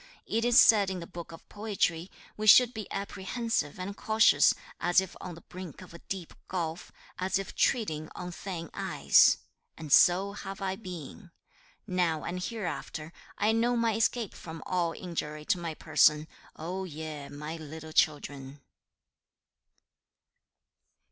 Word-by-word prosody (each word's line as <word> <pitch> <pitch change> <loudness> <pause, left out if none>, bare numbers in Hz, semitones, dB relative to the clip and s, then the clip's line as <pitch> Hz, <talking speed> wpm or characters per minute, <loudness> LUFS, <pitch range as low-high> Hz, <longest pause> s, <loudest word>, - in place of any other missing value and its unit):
It 225 +1 -1
is 240 +2 +6
said 205 -5 +6
in 190 -1 -3
the 170 - -7
Book 170 0 -9
of 165 - -13
Poetry, 195 -5 -1 0.3
"We 215 0 -3
should 245 +3 +8
be 215 -2 -7
apprehensive 200 - -2
and 195 +2 -5
cautious, 220 +1 +4 0.2
as 175 +1 +4
if 190 -2 -4
on 180 -2 -7
the 170 - -13
brink 180 -4 -9
of - - -14
a 170 - -10
deep 185 -2 -6
gulf, 170 -2 -4 0.3
as 185 +1 +1
if 195 - -5
treading 155 - 0
on 180 0 -6
thin 175 -2 -6
ice," - - +4 0.4
and 155 -3 -2
so 190 +3 +6
have 195 -1 -7
I 190 -1 -2
been. 180 -1 -9 0.6
Now 180 -5 0
and 180 +1 -4
hereafter, 170 -7 -5 0.2
I 210 +1 +3
know 235 +2 +2
my 230 -1 +2
escape 225 0 0
from 160 -1 -9
all 175 -2 0
injury 150 -4 -5
to 180 - +1
my 165 -2 -4
person, 155 -1 +3 0.3
O 180 +4 -4
ye, 155 -4 -7
my 150 +3 -6
little 160 0 -9
children.' 145 -3 0
180 Hz, 150 wpm, -29 LUFS, 160-200 Hz, 0.6 s, should